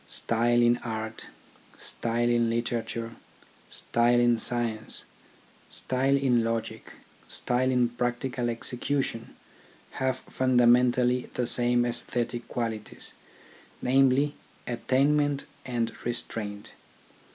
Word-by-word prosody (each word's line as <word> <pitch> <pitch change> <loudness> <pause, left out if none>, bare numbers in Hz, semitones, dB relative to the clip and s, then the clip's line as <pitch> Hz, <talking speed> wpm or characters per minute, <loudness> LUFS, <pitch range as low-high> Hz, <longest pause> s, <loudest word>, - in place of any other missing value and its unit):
Style 120 +1 +2
in 120 0 +4
art, 110 -1 -5 0.5
style 120 +1 -2
in 120 -1 +2
litera 115 0 -1
ture, 115 0 -6 0.6
style 120 +1 +2
in 120 -1 +3
science, 115 -2 -1 0.6
style 135 +2 +1
in 125 -4 +2
logic, 115 0 -4 0.3
style 125 +1 +1
in 125 -2 +3
practical 120 +1 -2
execution 120 0 -2 0.6
have 130 -1 -1
fundamentally 125 0 +3
the 125 - 0
same 120 0 +3
aesthetic 120 0 -2
qualities, 115 -3 -2 0.7
namely, 135 +2 +3 0.3
attainment 140 +4 +1 0.2
and 120 -3 -1
re 120 - 0
straint. 105 -3 -3
120 Hz, 95 wpm, -27 LUFS, 115-125 Hz, 0.7 s, in